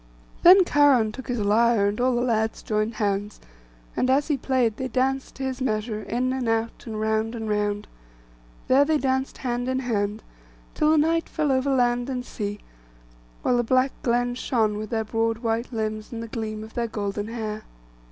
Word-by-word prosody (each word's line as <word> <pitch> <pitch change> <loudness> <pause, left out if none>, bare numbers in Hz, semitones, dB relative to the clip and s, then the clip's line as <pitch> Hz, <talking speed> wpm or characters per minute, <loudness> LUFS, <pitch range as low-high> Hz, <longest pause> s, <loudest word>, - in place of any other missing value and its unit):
Then 370 +2 +8
Cheiron 275 -9 +4
took 260 +4 -9
his 245 - -1
lyre, 215 +1 +3
and 210 +4 -3
all 255 0 +2
the 240 - +1
lads 220 -2 0
joined 215 +1 -1
hands; 205 -1 -2 0.6
and 255 - +1
as 280 +4 +2
be 295 - +3
played, 250 -4 0
they 260 - -2
danced 265 +1 -1
to 270 - -6
his 260 0 -3
measure, 215 -3 -1
in 250 +4 -1
and 255 -3 -2
out, 225 +1 -2
and 220 -1 -4
round 220 +1 0
and 225 -1 -4
round. 205 -1 -1 0.8
There 270 +2 +5
they 310 +1 +2
danced 265 -1 -1
hand 245 -1 -2
in 260 - 0
hand, 215 -4 -1 0.5
till 305 - +2
the 315 - +4
night 330 +2 +2
fell 300 -3 0
over 260 +1 +1
land 245 -1 +1
and 250 -2 -3
sea, 205 -3 -5 0.8
while 245 - +2
the 240 - +2
black 255 +3 +2
glen 245 0 +1
shone 225 -4 0
with 215 -1 -5
their 225 -1 -1
broad 225 +1 0
white 230 +1 -2
limbs 215 -2 -3
and 230 -1 -5
the - - -6
gleam 215 -1 -4
of 220 - -11
their 235 -1 -1
golden 205 -1 -3
hair. 215 -2 -5
235 Hz, 190 wpm, -25 LUFS, 215-260 Hz, 0.8 s, Then